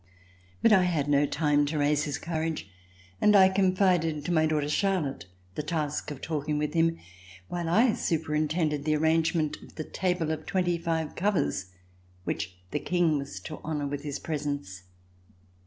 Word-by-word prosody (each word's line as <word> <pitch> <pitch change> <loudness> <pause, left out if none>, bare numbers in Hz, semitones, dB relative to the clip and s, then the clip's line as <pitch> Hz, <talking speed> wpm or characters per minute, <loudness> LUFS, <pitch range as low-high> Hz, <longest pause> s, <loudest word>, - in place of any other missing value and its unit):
But 230 - +6
I 185 -3 +5
had 160 -5 0
no 145 0 +3
time 145 -1 +2
to 150 +1 -2
raise 145 0 +2
his 145 - -2
courage, 160 - -3 0.5
and 210 0 +5
I 190 -1 +8
confided 185 -5 +2
to - - -1
my 160 -2 +3
daughter, 150 -2 0
Charlotte, 150 - 0 0.3
the - - -3
task 150 -2 -2
of 145 -3 -7
talking 150 -1 -2
with 150 0 -1
him 165 0 +2 0.5
while 170 -2 -3
I 225 +6 +4
superintended 155 -1 0
the 155 0 +2
arrange 160 +2 +2
ment 155 -3 0
of - - -15
the 155 - -4
table 180 -2 -1
of 155 0 -4
twenty 175 -2 +1
five 165 -2 -2
covers, 185 - 0 0.6
which 90 0 -3
the - - -1
King 170 -4 +1
was 135 -9 -6
to 155 - -8
honor 150 -2 -2
with 140 0 -3
his 145 -2 -4
presence. 145 - -4
155 Hz, 170 wpm, -28 LUFS, 145-170 Hz, 0.6 s, I